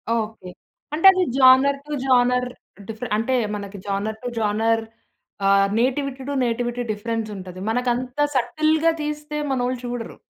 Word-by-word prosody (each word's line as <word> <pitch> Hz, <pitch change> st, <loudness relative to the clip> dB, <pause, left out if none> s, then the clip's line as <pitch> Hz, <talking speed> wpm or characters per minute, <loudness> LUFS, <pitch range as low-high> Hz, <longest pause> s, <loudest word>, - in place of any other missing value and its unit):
Okay. 215 Hz, -5 st, -4 dB, 0.4 s
అంటే 325 Hz, +5 st, -1 dB
అది 370 Hz, -1 st, +1 dB
genre 265 Hz, +1 st, +6 dB
to 300 Hz, -, -6 dB
genre 250 Hz, -1 st, +3 dB, 0.4 s
differ 225 Hz, +2 st, -6 dB
అంటే 230 Hz, +4 st, -1 dB, 0.2 s
మనకి 200 Hz, 0 st, -7 dB
జోనర్ 205 Hz, +2 st, -2 dB
టు -, -, -3 dB
జోనర్ 225 Hz, +2 st, +1 dB, 0.7 s
ఆహ్, 195 Hz, 0 st, +5 dB
నేటివిటీ 265 Hz, +1 st, -1 dB
టు -, -, -2 dB
నేటివిటీ 240 Hz, +1 st, -2 dB
డిఫరెన్స్ 225 Hz, +1 st, -3 dB
ఉంటది. 185 Hz, -1 st, -9 dB
మనకంత 250 Hz, +2 st, -1 dB, 0.2 s
సటిల్‌గా 310 Hz, +6 st, +2 dB
తీస్తే 300 Hz, 0 st, -4 dB
మనోళ్ళు 250 Hz, -1 st, -1 dB
చూడరు. 245 Hz, -2 st, -5 dB
245 Hz, 135 wpm, -22 LUFS, 220-265 Hz, 0.7 s, జోనర్